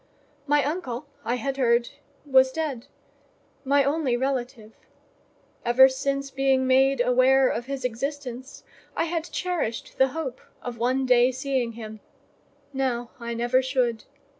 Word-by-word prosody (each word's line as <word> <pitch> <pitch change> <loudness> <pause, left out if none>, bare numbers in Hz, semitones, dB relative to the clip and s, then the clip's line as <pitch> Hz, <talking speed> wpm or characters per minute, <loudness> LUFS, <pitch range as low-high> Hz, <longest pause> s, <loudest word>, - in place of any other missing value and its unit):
My 290 0 +3
uncle 290 -4 -3 0.2
I 240 - -1
had 270 +3 -3
heard 240 -2 +2 0.4
was 260 -2 +4
dead—my 280 -1 -4
only 280 -3 0
relative; 245 -4 -3 0.9
ever 245 +2 +7
since 275 +1 -2
being 270 -1 +2
made 265 +1 +3
aware 255 +2 +4
of 240 0 -3
his 275 -2 -4
existence, 260 +1 -5 0.3
I - - +1
had 335 -1 -2
cherished 330 -10 -3
the 265 - +6
hope 270 -2 -5 0.2
of 240 -2 -6
one 255 +3 +1
day 250 0 +4
seeing 260 -2 -2
him: 220 -1 -9 0.7
now, 245 -3 -2
I 235 0 -5
never 240 +2 +2
should. 255 -3 -1
260 Hz, 130 wpm, -25 LUFS, 240-275 Hz, 0.9 s, ever